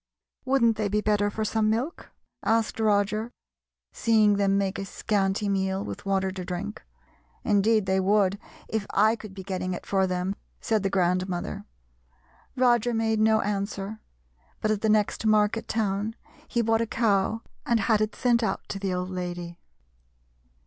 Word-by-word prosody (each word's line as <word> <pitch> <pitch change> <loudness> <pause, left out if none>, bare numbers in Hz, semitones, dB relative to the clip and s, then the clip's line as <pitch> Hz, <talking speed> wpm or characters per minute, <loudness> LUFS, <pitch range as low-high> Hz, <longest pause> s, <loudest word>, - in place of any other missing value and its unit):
"Wouldn't 240 -4 +3
they 215 -1 0
be 210 +1 +1
better 210 -1 +1
for 220 +1 -3
some 215 0 +1
milk?" 245 +10 -2 0.3
asked 225 0 +1
Roger, 215 +1 +1 0.6
seeing 215 -3 +3
them 195 -1 +2
make 195 -1 -1
a 195 - -3
scanty 195 0 -1
meal, 190 0 0
with - - -7
water 190 -1 +1
to 185 -1 -6
drink. 185 +4 -5 0.6
"Indeed 210 0 +3
they 190 0 +2
would 200 0 +2 0.3
if 220 -2 -2
I 215 +3 +5
could 215 -4 -11
be 190 - -7
getting 185 -1 -3
it - - -9
for 190 -1 +1
them," 180 +2 -2 0.2
said 220 -2 0
the 195 - 0
grandmother. 185 +1 -1 0.9
Roger 240 -2 +3
made 225 -1 +1
no 220 0 +4
answer, 200 +1 -3 0.6
but 215 - 0
at 210 -1 -1
the 220 - +1
next 210 0 +2
market 215 +1 +2
town 210 0 -1 0.3
he 235 - 0
bought 225 0 +2
a 230 - -1
cow 220 -1 +1 0.2
and 235 -2 +1
had 215 +1 +2
it 215 0 -1
sent 240 -1 +2
out 220 - -2
to 195 - -4
the 195 -1 -2
old 180 +1 -3
lady. 175 -1 -5
205 Hz, 165 wpm, -26 LUFS, 195-220 Hz, 0.9 s, I